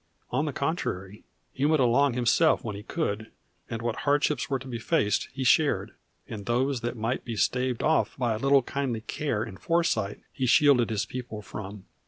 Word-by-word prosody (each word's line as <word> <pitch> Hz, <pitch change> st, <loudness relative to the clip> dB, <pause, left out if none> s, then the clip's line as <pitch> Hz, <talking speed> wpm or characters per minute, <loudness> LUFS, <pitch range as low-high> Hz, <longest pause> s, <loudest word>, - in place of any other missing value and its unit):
On 150 Hz, -, +1 dB
the 150 Hz, -, -1 dB
contrary, 105 Hz, -, -3 dB, 0.3 s
he 135 Hz, -, -3 dB
went 155 Hz, 0 st, +3 dB
along 130 Hz, +2 st, +3 dB
himself 125 Hz, +7 st, +3 dB
when 110 Hz, -4 st, -4 dB
he 100 Hz, -, -7 dB
could, 110 Hz, -4 st, -3 dB, 0.4 s
and 115 Hz, -1 st, -4 dB
what 120 Hz, -2 st, -1 dB
hardships 145 Hz, +1 st, +1 dB
were 135 Hz, -, +1 dB
to 135 Hz, +1 st, -10 dB
be 120 Hz, -2 st, -4 dB
faced 105 Hz, -2 st, +1 dB
he 135 Hz, 0 st, -4 dB
shared, 145 Hz, +4 st, +3 dB, 0.3 s
and 105 Hz, -3 st, -7 dB
those 125 Hz, +2 st, +1 dB
that 120 Hz, 0 st, -3 dB
might 115 Hz, +4 st, -2 dB
be 115 Hz, -, -5 dB
staved 125 Hz, +2 st, 0 dB
off 160 Hz, +1 st, +2 dB
by 120 Hz, -4 st, +1 dB
a 110 Hz, -, -3 dB
little 135 Hz, +1 st, +4 dB
kindly 130 Hz, -4 st, -2 dB
care 115 Hz, -1 st, -2 dB
and 100 Hz, -5 st, -9 dB
foresight 140 Hz, -, 0 dB
he 130 Hz, -2 st, -1 dB
shielded 125 Hz, -2 st, +5 dB
his 110 Hz, -3 st, -1 dB
people 120 Hz, -4 st, -7 dB
from. 100 Hz, -1 st, -8 dB
125 Hz, 190 wpm, -27 LUFS, 110-140 Hz, 0.4 s, shielded